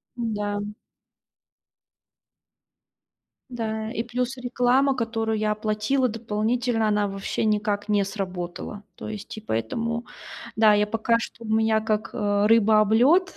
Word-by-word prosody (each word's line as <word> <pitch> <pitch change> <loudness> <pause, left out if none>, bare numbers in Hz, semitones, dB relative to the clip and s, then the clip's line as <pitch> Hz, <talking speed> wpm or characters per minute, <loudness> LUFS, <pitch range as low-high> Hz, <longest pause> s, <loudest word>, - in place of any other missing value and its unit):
Да. 210 -3 -2 2.9
Да. 220 -2 -3
И 230 -1 -2
плюс 250 +2 -3
реклама, 250 +2 +2
которую 225 -2 -1
я 215 0 +1
оплатила 215 +5 0
дополнительно, 225 +1 0
она 210 -1 +2
вообще 195 +2 -3
никак 210 -1 0
не 205 -1 +3
сработала. 195 0 -5
То - - -8
есть 215 0 -7
и - - -7
поэтому, 230 - -2 0.5
да, 215 -1 +6
я 210 0 +3
пока 225 +2 +1
что 230 0 -7
у - - -7
меня 220 0 +3
как, 215 0 -1
э, 205 -2 +1
рыба 220 -1 +5
об 215 0 +2
лёд 320 +12 +4
220 Hz, 130 wpm, -25 LUFS, 210-235 Hz, 2.9 s, да